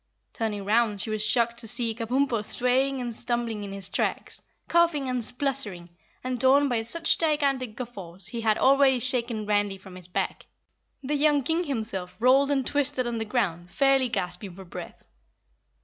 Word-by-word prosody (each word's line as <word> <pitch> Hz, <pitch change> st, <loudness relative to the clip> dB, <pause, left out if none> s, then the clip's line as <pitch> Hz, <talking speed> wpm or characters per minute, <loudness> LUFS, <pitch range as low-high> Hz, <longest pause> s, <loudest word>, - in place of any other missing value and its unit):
Turning 210 Hz, -3 st, -3 dB
round, 215 Hz, -1 st, +2 dB
she 220 Hz, -, -4 dB
was 215 Hz, -1 st, 0 dB
shocked 235 Hz, +1 st, +1 dB
to 230 Hz, -, -7 dB
see 235 Hz, 0 st, +1 dB
Kabumpo 235 Hz, 0 st, 0 dB
swaying 260 Hz, +4 st, +1 dB
and 240 Hz, -2 st, -4 dB
stumbling 235 Hz, -2 st, -2 dB
in 200 Hz, -, -6 dB
his 195 Hz, -1 st, -4 dB
tracks, -, -, -3 dB, 0.3 s
coughing 335 Hz, -5 st, +2 dB
and 250 Hz, -2 st, -1 dB
spluttering, 245 Hz, -9 st, -3 dB, 0.3 s
and 255 Hz, -1 st, -3 dB
torn 275 Hz, +2 st, +5 dB
by 240 Hz, -4 st, 0 dB
such 320 Hz, +9 st, +2 dB
gigantic 275 Hz, -7 st, 0 dB
guffaws 195 Hz, -7 st, -6 dB
he 235 Hz, -, -4 dB
had 220 Hz, -1 st, +2 dB
already 270 Hz, -1 st, +4 dB
shaken 240 Hz, -3 st, +1 dB
Randy 205 Hz, -1 st, 0 dB
from 190 Hz, -1 st, -13 dB
his 180 Hz, -1 st, -11 dB
back. 180 Hz, -, -3 dB, 0.6 s
The 275 Hz, +3 st, -2 dB
young 295 Hz, -1 st, +3 dB
King 325 Hz, +6 st, 0 dB
himself 215 Hz, -, -4 dB
rolled 265 Hz, +4 st, +4 dB
and 270 Hz, -3 st, +1 dB
twisted 285 Hz, -2 st, 0 dB
on 235 Hz, -1 st, -2 dB
the 220 Hz, -, -2 dB
ground, 180 Hz, -7 st, -2 dB
fairly 270 Hz, +5 st, +3 dB
gasping 180 Hz, -3 st, -3 dB
for 190 Hz, 0 st, -11 dB
breath. 175 Hz, -, -10 dB
240 Hz, 170 wpm, -26 LUFS, 210-270 Hz, 0.6 s, torn